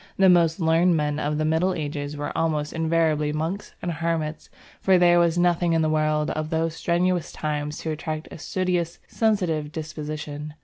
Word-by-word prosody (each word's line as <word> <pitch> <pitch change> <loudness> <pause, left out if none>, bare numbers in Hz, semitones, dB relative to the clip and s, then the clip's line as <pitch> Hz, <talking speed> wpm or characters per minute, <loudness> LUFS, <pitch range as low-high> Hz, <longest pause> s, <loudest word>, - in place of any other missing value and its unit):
The 190 -1 +6
most 170 -2 +4
learned 165 +1 +3
men 150 0 -1
of 150 0 -1
the 155 - 0
Middle 165 +4 +1
Ages 145 -1 -4
were 145 - -4
almost 155 -2 0
invariably 160 -2 +1
monks 165 +7 -4
and 175 - -1
hermits, 160 -1 -2 0.3
for 190 -1 +4
there 175 -1 +5
was 170 0 +2
nothing 175 -1 +2
in 165 -1 +2
the 155 - +2
world 155 -1 +1
of 155 0 -3
those 160 0 0
strenuous 175 +1 0
times 150 -1 -3
to 160 - -3
attract 155 0 -4
a - - -9
studious, 180 -1 -1
sensitive 180 -9 0
disposition. 150 -1 -6
160 Hz, 175 wpm, -24 LUFS, 150-175 Hz, 0.3 s, The